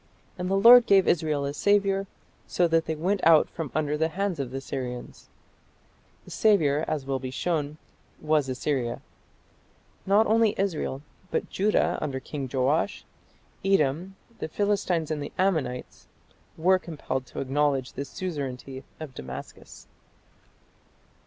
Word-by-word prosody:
And 180 -1 -4
the 195 - +2
Lord 240 +3 +8
gave 195 -2 +5
Israel 155 -4 +1
a 140 - -3
saviour, 200 +2 +2 0.4
so 175 - +2
that 165 0 +2
they 160 - -2
went 185 +6 -1
out 160 -1 +6
from 160 -5 -6
under 150 -1 0
the 160 - +3
hands 185 0 -2
of 135 -3 -3
the 135 +2 -4
Syrians." 125 -2 -6 1.0
The - - -13
"saviour", 155 -9 +3
as 145 -3 -2
will 135 -1 -1
be 130 0 -5
shown, 150 +1 -2 0.4
was 150 -3 +1
Assyria. 130 -2 -2 1.0
Not 205 +3 +5
only 225 -1 +3
Israel, 160 -8 -2 0.3
but - - -2
Judah, 210 +3 +1
under 140 -3 -2
King 135 0 -6
Joash, 140 +8 0 0.6
Edom, 185 -1 +1 0.2
the - - -3
Philistines 185 -3 0
and 150 -1 -2
the 145 - -6
Ammonites 155 -10 -1 0.5
were 185 +3 +4
compelled 135 -7 -5
to - - -7
acknowledge 135 -1 0
the 140 - -4
suzerainty 135 -5 -5 0.2
of 155 -4 -8
Damascus. 65 - -9
155 Hz, 140 wpm, -26 LUFS, 135-190 Hz, 1.0 s, Lord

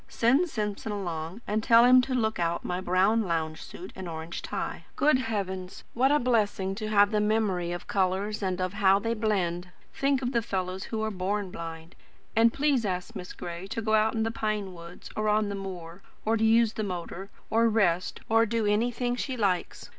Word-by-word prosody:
Send 270 +10 +2
Simpson 210 -3 -3
along; 175 0 -4
and 215 +1 0
tell 230 +1 +6
him 255 +1 +7
to 255 +1 -2
look 220 -4 0
out 170 0 -1
my 180 +1 -2
brown 190 +5 +3
lounge 160 -5 -2
suit 185 +2 -10
and 185 -2 -6
orange 160 +1 -6
tie. - - -4
Good 295 -3 +4
heavens! 190 -5 -4
what 260 +4 +3
a 295 - +5
blessing 215 -7 +1
to 215 +2 -4
have 205 -1 +4
the 210 -1 +2
MEMORY 210 -5 +1
of 175 - -5
colours 195 +2 0
and 185 -2 -1
of 185 0 -1
how 195 -2 +4
they 225 +3 -1
blend! 185 -6 -1 0.2
Think 275 -1 +1
of 245 - -1
the 235 -2 +1
fellows 190 -3 -3
who 220 -1 -3
are 220 - -1
BORN 195 0 -2
blind. 165 -1 -8 0.4
And 230 +1 +5
please 280 -3 +1
ask 185 +3 -3
Miss 180 -2 -6
Gray 175 +2 -7
to 225 - -3
go 215 0 0
out 220 +1 +3
in 220 - +1
the 225 - -1
pine 215 -4 -2
wood, 170 0 -11
or 215 0 0
on 210 0 +2
the - - -3
moor, 185 -3 -7 0.2
or 220 +1 +2
use 225 0 +4
the - - -3
motor, 185 0 -5 0.2
or 230 +1 +4
rest, 185 -5 +1
or 225 +1 +4
do 225 0 0
anything 240 +4 +1
she 255 +1 -3
likes. 195 -5 -1
210 Hz, 200 wpm, -28 LUFS, 185-225 Hz, 0.4 s, him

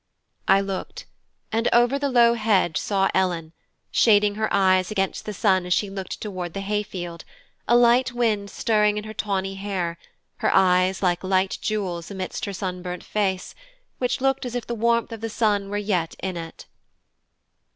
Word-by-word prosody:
I 195 0 +5
looked, 195 -1 -5 0.5
and 225 +1 +1
over 240 +4 +4
the 285 0 0
low 235 -2 +5
hedge 210 -8 +1
saw 195 -2 +1
Ellen, 170 -4 0 0.4
shading 210 -2 +4
her 215 +1 -2
eyes 185 -2 +3
against 195 -3 -2
the 215 - -3
sun 190 -2 +2
as 180 0 0
she 205 -2 -1
looked 195 -2 -6
toward 185 -5 -5
the 195 - -3
hay 205 +1 -1
field, 175 -5 -7 0.4
a 240 - +4
light 240 +2 +4
wind 220 -5 0
stirring 210 -1 +1
in 210 - -3
her 215 0 -8
tawny 195 -3 -2
hair, 190 -4 -3 0.4
her - - +1
eyes 185 +1 +3
like 175 -1 +1
light 190 0 +1
jewels 185 -6 -3
amidst 190 -2 -4
her 200 - -5
sunburnt 180 -1 -5
face, 190 -3 -2 0.5
which 250 0 -1
looked 270 0 +1
as 245 -1 -5
if 245 - -3
the 235 - -4
warmth 235 +1 +1
of 225 -1 -7
the 225 - -3
sun 205 -3 0
were 205 - -2
yet 190 -6 -1
in 190 -1 -2
it. 165 -1 -8
200 Hz, 175 wpm, -24 LUFS, 185-220 Hz, 0.5 s, I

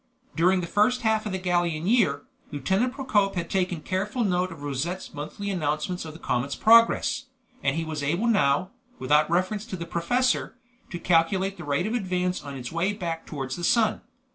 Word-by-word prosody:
During 180 +3 +3
the - - -3
first 215 +8 +2
half 220 -1 +1
of - - -4
the 190 - -1
Gallian 175 -3 0
year, 190 - +2 0.3
Lieutenant 190 - 0
Procope 210 -8 0
had 170 -1 -3
taken 180 -4 0
careful 205 - -2
note 185 -2 0
of 150 -3 -10
Rosette's 150 +7 -3
monthly 155 +7 -5
announcements 165 +1 -2
of 155 - -8
the 160 - -12
comet's 125 0 -1
progress, 230 +4 +4 0.4
and 140 0 +1
he 165 0 -2
was 155 -2 -4
able 170 +10 0
now, 185 -6 +2 0.3
without 150 +4 +3
reference 185 +4 0
to 195 - -5
the 170 -2 -5
professor, 245 +10 0 0.3
to 175 - -5
calculate 185 +3 +1
the 175 - -8
rate 145 -1 0
of 220 - -2
advance 180 -5 -1
on 140 -1 -7
its 125 -2 -6
way 170 +5 0
back 170 -5 -5
towards 135 -3 -4
the 175 - -6
sun. 225 +5 +2
180 Hz, 190 wpm, -26 LUFS, 155-205 Hz, 0.4 s, progress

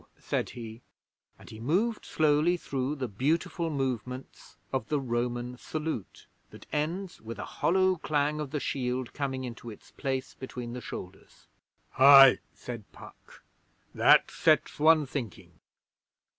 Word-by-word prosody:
said - - -2
he; 115 -1 -9 0.6
and - - -14
he 110 - -10
moved 195 - 0
slowly 155 +3 +2
through 135 -2 -3
the 135 -3 -3
beautiful 160 - -1
movements 130 -3 -4 0.2
of 130 - -1
the 150 - 0
Roman 120 0 -3
Salute, 155 - -5 0.2
that - - -14
ends 170 +5 -3
with 115 +1 -7
a - - -5
hollow 185 +1 +1
clang 150 -1 0
of 150 -2 -4
the 150 +2 -2
shield 125 -2 -3
coming 135 -2 -3
into 120 -1 -7
its 105 - -13
place 130 -2 -3
between 125 -2 -7
the 125 - -6
shoulders. 90 -4 -10 0.5
'Hai!' 135 0 +8
said 115 -4 -9
Puck. - - -15 0.5
'That - - +5
sets - - +2
one 155 0 +5
thinking!' 125 -6 -7
135 Hz, 135 wpm, -29 LUFS, 125-150 Hz, 0.6 s, Hai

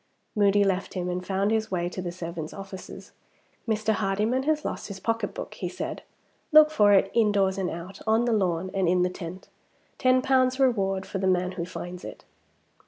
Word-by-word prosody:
Moody 205 -1 +4
left 195 0 -1
him, 180 -1 -2
and 180 0 -3
found 195 +2 0
his 220 0 0
way 175 -2 -1
to 180 +1 -5
the 175 -1 -4
servants' 170 -2 -6
offices. 195 -1 -9 0.6
"Mr. 220 0 +1
Hardyman 215 +5 0
has 305 -1 0
lost - - -4
his 200 -2 -7
pocketbook," 230 - -3
he - - -4
said. - - -5 0.5
"Look 305 0 +8
for 210 -8 +4
it, 195 0 +4
indoors 200 -4 +2
and 185 - -1
out 175 +3 -7
on 220 +2 +3
the 240 - +1
lawn, 185 -3 0
and 190 -3 +1
in 180 0 +3
the 180 - 0
tent. 180 +1 -8 0.5
Ten 255 0 +3
pounds 260 -1 +2
reward 195 -7 +1
for 195 - -4
the 190 - 0
man 180 0 +1
who 175 -2 -4
finds 180 0 -7
it!" - - -9
195 Hz, 190 wpm, -26 LUFS, 180-220 Hz, 0.6 s, Look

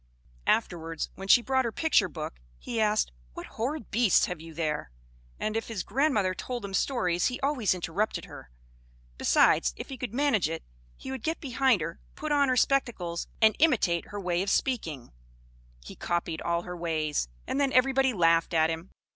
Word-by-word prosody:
Afterwards, 165 -7 0
when 195 - -8
she 240 +4 +6
brought 260 +1 +2
her 235 - -2
picture 240 - +2
book, - - -7 0.2
he 225 - -3
asked, 210 - +2 0.2
"What - - -6
horrid 250 +1 -4
beasts 225 -3 +4
have 180 -3 -5
you 165 0 -10
there?" 155 - -2 0.5
And 215 - -2
if 225 - -2
his 215 -6 -4
grandmother 255 -10 +1
told 245 +5 -5
them 200 -1 -6
stories, 180 -6 +1
he 250 0 -3
always 270 -9 +1
interrupted 180 +4 -2
her; - - -12 0.7
besides, 65 -1 +4
if - - -7
he 265 - -7
could 245 -5 -4
manage 255 - +2
it, 165 0 -5 0.3
he - - -7
would 265 -3 -5
get 320 +5 -2
behind 260 - +2
her, 165 +2 -4 0.2
put 310 0 -4
on 285 -2 +3
her 255 - +2
spectacles, 225 -11 0 0.2
and 220 0 +6
imitate 230 - +2
her 205 - -6
way 180 -2 0
of 200 - -1
speaking; 165 - -1 0.7
he - - -8
copied 170 -1 -2
all 170 0 -1
her 180 - -6
ways, 155 - -1 0.2
and 280 - -1
then 275 -1 +2
everybody 265 +1 +3
laughed 165 -5 +2
at 160 0 +4
him. 165 +3 -6
205 Hz, 180 wpm, -28 LUFS, 170-260 Hz, 0.7 s, she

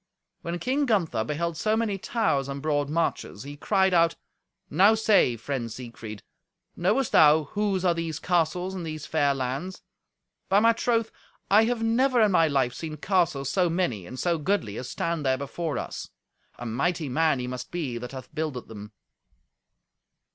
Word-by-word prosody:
When 170 +1 -3
King 270 +8 0
Gunther 170 - +1
beheld 165 +6 -2
so 215 0 +1
many 215 -4 -1
towers 145 - 0
and 140 0 -4
broad 145 -1 0
marches, 165 -3 -2
he 145 +1 -8
cried 190 +4 +2
out, 170 -1 +4 0.5
"Now 195 +8 +5
say, 210 - +3
friend 120 -1 -4
Siegfried; 115 -3 -8 0.5
knowest 215 +9 +1
thou 155 +1 +6
whose 195 +4 -1
are 175 - +4
these 165 -2 -3
castles 180 +2 0
and 185 -2 -5
these 155 -2 -5
fair 145 -3 +1
lands? 135 +8 -4 0.7
By 195 - +5
my 230 +2 +5
troth, 230 -1 0 0.4
I 215 +3 +6
have 235 -1 -1
never 250 +3 +2
in 215 -2 +4
my 165 -3 +4
life 135 -4 +1
seen 155 +1 -6
castles 160 -6 0
so 180 0 +2
many 145 - -1
and 130 - -8
so 170 -2 0
goodly 150 - -1
as 125 - -6
stand 165 -2 -2
there 130 -1 +2
before 145 +3 -4
us. - - -5 0.5
A - - -7
mighty 145 +8 -1
man 155 +2 +2
he 125 - -3
must 125 0 -6
be 140 -9 -3
that 125 0 -7
hath 130 +3 -9
builded 155 -6 -4
them." 105 -1 -10
160 Hz, 170 wpm, -26 LUFS, 135-190 Hz, 0.7 s, thou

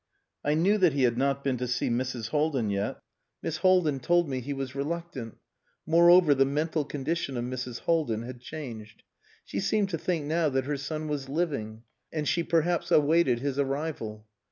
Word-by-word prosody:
I 145 +1 +2
knew 195 +7 +3
that 180 -6 +4
he 140 -2 +1
had 120 -2 +3
not 140 +2 0
been 135 -2 0
to 125 +1 -3
see 125 +1 -1
Mrs. 120 -2 -2
Haldin 145 -7 0
yet. 100 +1 -2 0.4
Miss - - -2
Haldin 180 -7 +3
told 175 +6 +2
me 130 -2 -2
he 140 +4 -5
was 135 -1 -4
reluctant; 140 -5 -4 0.5
moreover, 170 -1 +6
the 135 -1 +4
mental 150 +3 0
condition 145 -1 -3
of 120 - -2
Mrs. 125 -1 -5
Haldin 145 -10 0
had 120 0 -8
changed. 115 -7 -8 0.4
She - - -4
seemed 200 0 +1
to 165 - -2
think 165 -2 -1
now 160 +1 +1
that 135 -1 0
her 145 0 -2
son 155 +3 -4
was 140 -3 -3
living, 135 -9 -2 0.3
and 150 -2 -2
she 170 - +2
perhaps 170 +1 +1
awaited 150 -5 +3
his 140 0 -2
arrival. 135 -7 -3
140 Hz, 180 wpm, -28 LUFS, 125-165 Hz, 0.5 s, moreover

